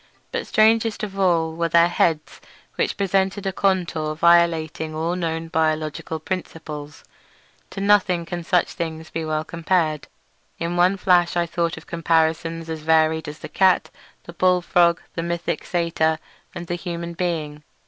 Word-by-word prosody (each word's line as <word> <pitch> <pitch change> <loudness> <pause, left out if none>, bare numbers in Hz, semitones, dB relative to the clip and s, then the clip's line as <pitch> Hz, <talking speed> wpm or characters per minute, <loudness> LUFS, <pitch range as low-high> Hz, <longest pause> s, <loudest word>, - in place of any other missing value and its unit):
But - - -3
strangest 220 0 +3
of 195 -2 -5
all 165 -4 +2
were 170 +1 -1
their 170 +1 +5
heads, 160 -3 0 0.3
which - - -1
presented 195 0 0
a 190 - -1
contour 170 -6 0
violating 165 -2 +2
all 165 +3 -1
known 165 -2 -3
biological 155 0 -1
principles. 155 -4 -6 0.7
To 195 - -6
nothing 195 -4 +3
can 175 0 -5
such 175 +1 +2
things 160 -1 -5
be 165 - -3
well 155 0 -1
compared—in 165 0 -3
one 180 +3 +3
flash 175 -2 +3
I 170 - +2
thought 170 0 -2
of - - -11
comparisons 165 0 0
as 160 -1 -4
varied 160 0 +2
as 150 +1 -7
the - - -8
cat, 190 -1 +2 0.3
the 170 - -11
bulldog, 175 -1 +3
the - - -3
mythic 170 0 -3
Satyr, 165 -2 0 0.4
and 175 - -6
the 175 - -4
human 170 -1 -5
being. 160 -4 -3
170 Hz, 150 wpm, -22 LUFS, 160-180 Hz, 0.7 s, their